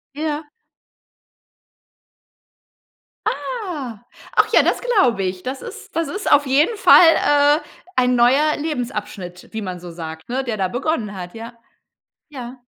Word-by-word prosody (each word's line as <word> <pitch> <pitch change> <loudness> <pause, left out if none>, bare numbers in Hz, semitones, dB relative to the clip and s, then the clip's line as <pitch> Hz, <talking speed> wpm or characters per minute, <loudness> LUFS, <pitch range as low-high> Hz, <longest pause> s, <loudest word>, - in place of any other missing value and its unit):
Ja. 300 0 -3 2.8
Ah, 315 - -4 0.4
ach - - +5
ja, - - +6
das - - +1
glaube 260 - +2
ich. 185 0 -3
Das 260 +1 -5
ist - - -10
das 330 0 0
ist 390 +8 -3
auf 285 - +5
jeden 290 - +2
Fall, 350 -6 +7
äh, 290 +1 +4 0.4
ein 250 -1 +3
neuer 270 +6 +4
Lebensabschnitt, 210 - -5
wie 220 -1 -4
man 185 -2 -5
so 175 -1 -9
sagt, 160 +2 -8
ne? 265 +2 -1
Der 235 -4 -3
da 190 -2 0
begonnen 245 - -2
hat, 180 -1 -7
ja. 230 +1 -8 0.8
Ja. 255 -3 -8
255 Hz, 135 wpm, -20 LUFS, 205-300 Hz, 2.8 s, Fall